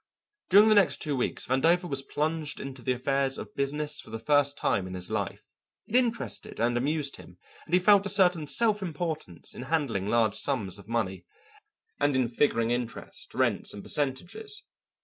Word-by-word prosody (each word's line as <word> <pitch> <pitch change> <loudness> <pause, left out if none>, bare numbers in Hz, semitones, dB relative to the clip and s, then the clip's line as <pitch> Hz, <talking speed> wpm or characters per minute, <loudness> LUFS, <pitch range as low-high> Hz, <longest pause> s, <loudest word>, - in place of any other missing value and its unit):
During 205 +3 +7
the - - +6
next 205 -3 +4
two 150 -3 -2
weeks 125 - -1
Vandover 165 +8 +2
was 135 -4 0
plunged 155 +2 -2
into 135 -1 -7
the 130 - -1
affairs 135 +1 0
of - - -8
business 150 +2 0
for - - -14
the 115 - -4
first 145 +4 +3
time 95 -2 0
in 95 - -6
his 90 -1 -3
life. - - -3 0.4
It 230 - -5
interested 240 - 0
and 120 +1 +1
amused 145 +3 -1
him, 90 - -14 0.3
and 170 - -9
he - - +5
felt 200 +1 +5
a - - -1
certain 180 -5 +3
self 215 +3 +2
importance 155 - -4
in - - -8
handling 135 -12 0
large 110 -2 +2
sums 105 -9 -2
of 100 +2 -15
money, 110 -5 -2 0.7
and 145 -1 +2
in 130 -3 +2
figuring 115 -2 +1
interest, 120 -1 -5
rents, - - 0
and 100 - -8
percentages. 175 - -2
140 Hz, 180 wpm, -28 LUFS, 120-170 Hz, 0.7 s, During